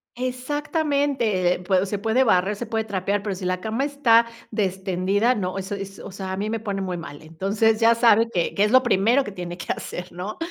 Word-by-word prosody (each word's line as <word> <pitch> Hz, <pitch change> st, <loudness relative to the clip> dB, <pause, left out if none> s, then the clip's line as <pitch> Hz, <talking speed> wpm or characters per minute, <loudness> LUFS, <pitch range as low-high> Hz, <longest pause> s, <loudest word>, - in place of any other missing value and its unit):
exactamente, 260 Hz, -, 0 dB
eh -, -, -8 dB
pue 185 Hz, +1 st, +1 dB
se 200 Hz, 0 st, -3 dB
puede 225 Hz, +5 st, +2 dB
barrer, 195 Hz, -2 st, +2 dB
se 240 Hz, -, -5 dB
puede 220 Hz, 0 st, -1 dB
trapear, 200 Hz, 0 st, -1 dB
pero 200 Hz, -2 st, -3 dB
si 185 Hz, 0 st, -7 dB
la 185 Hz, 0 st, -1 dB
cama 225 Hz, +5 st, -1 dB
está, 245 Hz, -6 st, +4 dB, 0.2 s
destendida, 195 Hz, +2 st, 0 dB
no, 185 Hz, -2 st, -3 dB
eso 195 Hz, +2 st, -4 dB
eso 195 Hz, 0 st, -8 dB
es, -, -, -10 dB
o -, -, -9 dB
sea, 190 Hz, 0 st, -6 dB
a 190 Hz, -, -3 dB
mí 210 Hz, +2 st, -2 dB
me 225 Hz, 0 st, -2 dB
pone 200 Hz, -3 st, -3 dB
muy 185 Hz, -2 st, -3 dB
mal, 145 Hz, -3 st, -9 dB
entonces 200 Hz, +8 st, 0 dB
ya 230 Hz, 0 st, +5 dB
sabe 230 Hz, -1 st, +4 dB
que, 175 Hz, -2 st, -1 dB
que 200 Hz, -, +3 dB
es 210 Hz, -, +2 dB
lo 255 Hz, 0 st, +7 dB
primero 240 Hz, +3 st, +3 dB
que 205 Hz, -, -7 dB
tiene 175 Hz, -2 st, -6 dB
que 165 Hz, -, -4 dB
hacer, 180 Hz, +1 st, -6 dB
¿no? 180 Hz, +5 st, -6 dB
205 Hz, 230 wpm, -23 LUFS, 185-230 Hz, 0.2 s, lo